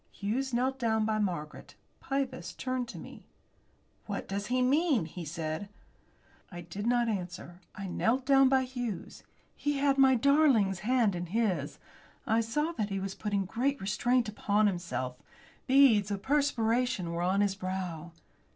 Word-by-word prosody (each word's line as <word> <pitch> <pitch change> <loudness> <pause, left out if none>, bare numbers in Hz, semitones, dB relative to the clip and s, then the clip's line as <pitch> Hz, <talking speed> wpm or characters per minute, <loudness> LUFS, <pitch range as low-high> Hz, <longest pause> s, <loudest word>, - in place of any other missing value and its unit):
Hughes 245 +7 -2
knelt 260 +2 0
down 220 -2 +1
by 215 0 0
Margaret. 175 -7 -4 0.2
Pybus 270 -2 -3
turned 255 -1 -3
to - - -9
me. - - -11 0.8
"What 205 -2 -4
does 200 +1 -3
he 255 +1 +1
mean?" 280 - +2
he 170 +2 -8
said. 160 +4 -4 0.8
I 175 -1 -7
did 195 +6 -5
not 240 0 +2
answer. 180 -3 -5
I 195 - -6
knelt 230 +7 0
down 270 -1 +5
by 265 -1 +3
Hughes. 245 -7 -5 0.3
He 290 -1 -1
had 275 0 +2
my 265 -1 +6
darling's 250 - +3
hand 230 -1 +2
in 175 0 -4
his. 180 -8 -1 0.5
I 225 +1 +2
saw 295 +9 -1
that 210 -1 0
he 195 -1 -2
was 195 0 -4
putting 200 -2 -2
great 260 +8 -1
restraint 240 +5 +1
upon 210 0 +1
himself. 170 -10 -2 0.5
Beads 255 -7 +5
of 200 -1 -4
perspiration 245 - +1
were 170 0 -3
on 185 +3 +2
his 200 -2 +2
brow. 185 -3 -5
215 Hz, 155 wpm, -30 LUFS, 190-255 Hz, 0.8 s, my